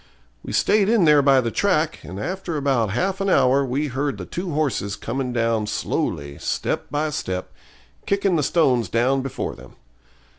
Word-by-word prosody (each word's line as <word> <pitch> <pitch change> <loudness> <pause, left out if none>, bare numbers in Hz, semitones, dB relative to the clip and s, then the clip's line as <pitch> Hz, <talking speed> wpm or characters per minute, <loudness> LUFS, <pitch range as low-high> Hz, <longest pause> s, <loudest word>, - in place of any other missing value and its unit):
We - - -7
stayed 205 0 +3
in 220 -6 +4
there 150 -2 +6
by 135 -1 +5
the 115 -2 -2
track, 165 - +1
and 95 +3 -8
after 180 - -3
about 135 -6 +1
half 185 - -1
an 195 - 0
hour 135 -5 +4
we 135 +3 -1
heard 135 -2 -2
the 90 - -6
two 180 - -5
horses 140 -9 -1
coming 125 +2 -3
down 115 -3 0
slowly, 70 -7 -3
step - - -2
by 150 +1 -1
step, 95 -8 -4 0.6
kicking 200 -2 +1
the 155 - +2
stones 130 - +2
down 130 +5 +2
before 135 0 -4
them. - - -14
135 Hz, 175 wpm, -22 LUFS, 115-165 Hz, 0.6 s, there